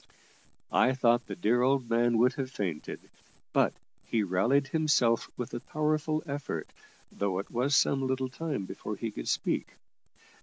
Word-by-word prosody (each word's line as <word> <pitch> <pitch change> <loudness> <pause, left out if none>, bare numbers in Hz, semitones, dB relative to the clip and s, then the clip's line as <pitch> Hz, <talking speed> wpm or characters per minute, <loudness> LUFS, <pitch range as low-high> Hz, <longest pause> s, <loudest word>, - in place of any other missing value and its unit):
I 130 - +4
thought 120 -1 +3
the 100 - -5
dear 110 +7 +2
old 130 -1 +2
man 120 0 +2
would 125 +3 +4
have 135 -3 -3
fainted, 90 - -4 0.5
but - - +3 0.3
he 110 -2 0
rallied 105 +10 +2
himself 140 -7 +2
with 125 - -5
a - - -2
powerful 155 +3 -1
effort, 140 - -4 0.4
though 100 -2 -1
it 100 - -5
was 130 +4 +1
some 135 -1 +3
little 130 0 0
time 140 -7 -3
before - - -5
he - - -4
could - - -7
speak. - - -1
125 Hz, 155 wpm, -30 LUFS, 115-140 Hz, 0.5 s, I